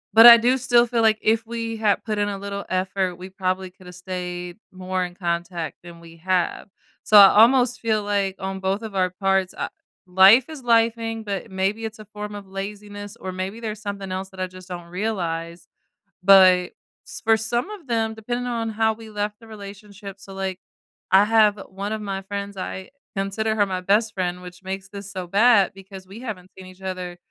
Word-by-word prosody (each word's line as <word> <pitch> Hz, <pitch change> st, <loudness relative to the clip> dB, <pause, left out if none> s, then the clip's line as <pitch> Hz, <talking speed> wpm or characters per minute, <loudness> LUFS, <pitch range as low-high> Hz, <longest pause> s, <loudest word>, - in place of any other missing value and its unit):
but 225 Hz, +1 st, +11 dB
I 235 Hz, 0 st, +12 dB
do 245 Hz, +3 st, +2 dB
still 240 Hz, -1 st, +4 dB
feel 235 Hz, -1 st, 0 dB
like 220 Hz, -1 st, +4 dB
if 225 Hz, +1 st, +2 dB
we 230 Hz, -1 st, -4 dB
had 215 Hz, -2 st, +1 dB
put 215 Hz, -2 st, -2 dB
in 205 Hz, 0 st, +1 dB
a 200 Hz, -, -4 dB
little 200 Hz, 0 st, -5 dB
effort, 185 Hz, 0 st, -1 dB
we 185 Hz, +2 st, -10 dB
probably 185 Hz, 0 st, -3 dB
coulda 180 Hz, -1 st, -14 dB
stayed 180 Hz, 0 st, -6 dB
more 185 Hz, 0 st, -3 dB
in 175 Hz, 0 st, -6 dB
contact 170 Hz, -2 st, -3 dB
than 170 Hz, -1 st, -12 dB
we 165 Hz, 0 st, -14 dB
have. 185 Hz, +2 st, -1 dB, 0.4 s
So 210 Hz, -, +5 dB
I 195 Hz, -1 st, +11 dB
almost 245 Hz, +2 st, +4 dB
feel 215 Hz, -2 st, 0 dB
like 200 Hz, -2 st, -1 dB
on 190 Hz, 0 st, -4 dB
both 195 Hz, +3 st, -1 dB
of 220 Hz, -2 st, -7 dB
our 185 Hz, -1 st, +2 dB
parts, 195 Hz, 0 st, 0 dB
uh, -, -, -3 dB, 0.4 s
life 190 Hz, +7 st, +6 dB
is 310 Hz, -3 st, -8 dB
lifing, 230 Hz, -1 st, +1 dB
but 200 Hz, +1 st, -4 dB
maybe 195 Hz, +4 st, -1 dB
it's 220 Hz, -1 st, -5 dB
a 215 Hz, -, -10 dB
form 210 Hz, 0 st, -7 dB
of 200 Hz, -1 st, -9 dB
laziness, 205 Hz, +2 st, -7 dB
or 185 Hz, -, -5 dB
maybe 190 Hz, +4 st, -5 dB
there's 215 Hz, -2 st, -5 dB
something 200 Hz, -2 st, -5 dB
else 190 Hz, +1 st, -4 dB
that 190 Hz, -, -14 dB
I 185 Hz, -, 0 dB
just 185 Hz, 0 st, -13 dB
don't 175 Hz, -1 st, -7 dB
realize. 170 Hz, -4 st, -4 dB, 0.6 s
But 185 Hz, -2 st, +6 dB, 0.4 s
s -, -, -8 dB
for 225 Hz, 0 st, +4 dB
some 235 Hz, -, -2 dB
of 375 Hz, -10 st, -10 dB
them, 225 Hz, -2 st, 0 dB
depending 240 Hz, +3 st, -4 dB
on 230 Hz, -2 st, -2 dB
how 220 Hz, 0 st, +1 dB
we 220 Hz, 0 st, -12 dB
left 210 Hz, 0 st, -4 dB
the 225 Hz, -, -16 dB
relationship 200 Hz, -1 st, -10 dB
so, 195 Hz, 0 st, -12 dB
like, 190 Hz, -1 st, -4 dB, 0.5 s
I 190 Hz, +2 st, +7 dB
have 215 Hz, -1 st, +4 dB
one 200 Hz, +3 st, -4 dB
of 215 Hz, -, -4 dB
my 195 Hz, -1 st, -4 dB
friends, 200 Hz, 0 st, -6 dB
I 185 Hz, 0 st, -6 dB, 0.3 s
consider 205 Hz, +3 st, -1 dB
her 205 Hz, -2 st, +3 dB
my 185 Hz, -1 st, -3 dB
best 210 Hz, +3 st, +2 dB
friend, 180 Hz, -1 st, -3 dB
which 180 Hz, 0 st, -11 dB
makes 190 Hz, 0 st, -6 dB
this 200 Hz, 0 st, -8 dB
so 185 Hz, -2 st, -5 dB
bad 205 Hz, +1 st, +4 dB
because 195 Hz, 0 st, -12 dB
we 195 Hz, +4 st, -11 dB
haven't 200 Hz, -7 st, -7 dB
seen 190 Hz, -, -10 dB
each 185 Hz, +1 st, -15 dB
other 185 Hz, -2 st, -5 dB
200 Hz, 205 wpm, -23 LUFS, 185-220 Hz, 0.6 s, I